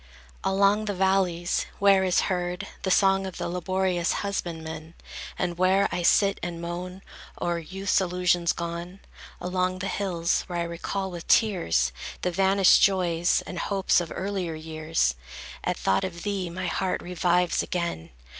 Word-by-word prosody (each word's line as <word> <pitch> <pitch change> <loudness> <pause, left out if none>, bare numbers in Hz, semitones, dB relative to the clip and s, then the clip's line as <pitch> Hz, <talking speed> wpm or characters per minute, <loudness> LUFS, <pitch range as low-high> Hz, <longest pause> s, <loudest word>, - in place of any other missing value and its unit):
Along 200 +2 +3
the 205 -2 -2
valleys 185 -2 +1
where 200 -1 +5
is 185 -1 +3
heard 180 -1 -2 0.2
The 190 - -2
song 195 0 +3
of 185 - -8
the - - -3
laborious 180 0 0
husbandman, 160 -4 -5 0.4
And 175 -1 -2
where 190 +2 +4
I 175 - -1
sit 200 +3 +3
and 175 -1 -4
moan 180 +2 -6 0.4
O'er 175 -1 -1
youth's 190 +4 0
illusions 180 -1 +1
gone; 170 +2 -5 0.4
Along 185 0 -1
the 185 - -4
hills, 175 -5 0
where 175 - -4
I 170 - 0
recall 185 +3 -4
with 170 -2 -8
tears, 170 - +3 0.3
The 180 - +1
vanished 195 +1 +5
joys 175 -3 +2
and 180 - -6
hopes 195 -3 +2
of 170 - -6
earlier 190 -4 -3
years, 155 - -1 0.5
At - - -1
thought 95 - +1
of 170 -2 -5
thee, 195 -4 -2
my 185 +2 -5
heart 185 +1 -1
revives 180 0 +1
again. 170 - -3
180 Hz, 150 wpm, -26 LUFS, 170-190 Hz, 0.5 s, where